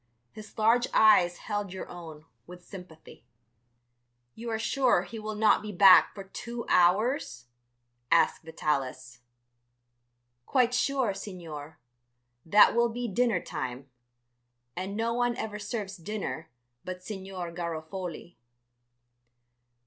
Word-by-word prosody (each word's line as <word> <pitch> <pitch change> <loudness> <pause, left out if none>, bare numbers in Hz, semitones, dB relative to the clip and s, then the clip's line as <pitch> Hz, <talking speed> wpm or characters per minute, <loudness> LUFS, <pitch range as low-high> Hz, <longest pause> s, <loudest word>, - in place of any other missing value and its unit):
His 215 0 -13
large 230 +3 +3
eyes 185 -5 +5
held 205 -3 -4
your 190 - -7
own 160 -3 -10 0.2
with 180 0 -12
sympathy. 180 -5 -12 1.1
"You 235 +1 -7
are 225 - -1
sure 255 +3 +2
he 225 - -8
will 215 0 -5
not 215 +1 +4
be 210 0 -6
back 195 0 +7
for 195 - -7
two 235 +5 -7
hours?" 180 - +2 0.6
asked - - +3
Vitalis. 135 -6 -3 1.3
"Quite 250 -2 +2
sure, 260 -3 +1
Signor. 165 -6 -8 0.7
That 205 +6 +6
will 235 0 +3
be 240 +1 -4
dinner 225 -3 +1
time, 130 +1 -6 0.8
and 195 +3 -4
no 230 +1 0
one 245 0 0
ever 210 -3 -5
serves 205 -2 -5
dinner 175 -3 -5 0.3
but 185 0 -7
Signor 190 -4 -6
Garofoli." 170 +1 -6
195 Hz, 115 wpm, -28 LUFS, 170-225 Hz, 1.3 s, back